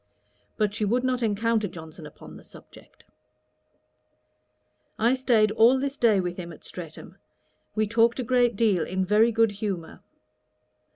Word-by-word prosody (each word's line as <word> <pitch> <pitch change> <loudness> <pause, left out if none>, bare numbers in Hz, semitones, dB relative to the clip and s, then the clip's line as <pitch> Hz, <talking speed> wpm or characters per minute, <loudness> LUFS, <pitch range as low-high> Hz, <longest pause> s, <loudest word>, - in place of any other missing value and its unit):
But 210 -1 0
she 215 +1 -3
would 240 +5 0
not 255 -1 -1
encounter 225 0 0
Johnson 160 -3 -11
upon 150 - -14
the - - -14
subject. - - -18 1.9
I 230 +3 +2
staid 235 -5 +2
all 230 +4 +4
this 275 +1 -3
day 225 -7 +3
with 180 -1 -3
him 170 -2 -7
at 160 - -14
Streatham. 165 -4 -10 0.6
He 215 0 +1
talked 230 +2 +2
a - - -1
great 245 -1 +2
deal, 200 -6 +1
in 185 +1 -2
very 215 +4 +3
good 225 -1 +2
humour. 195 -5 -5
215 Hz, 150 wpm, -25 LUFS, 190-235 Hz, 1.9 s, all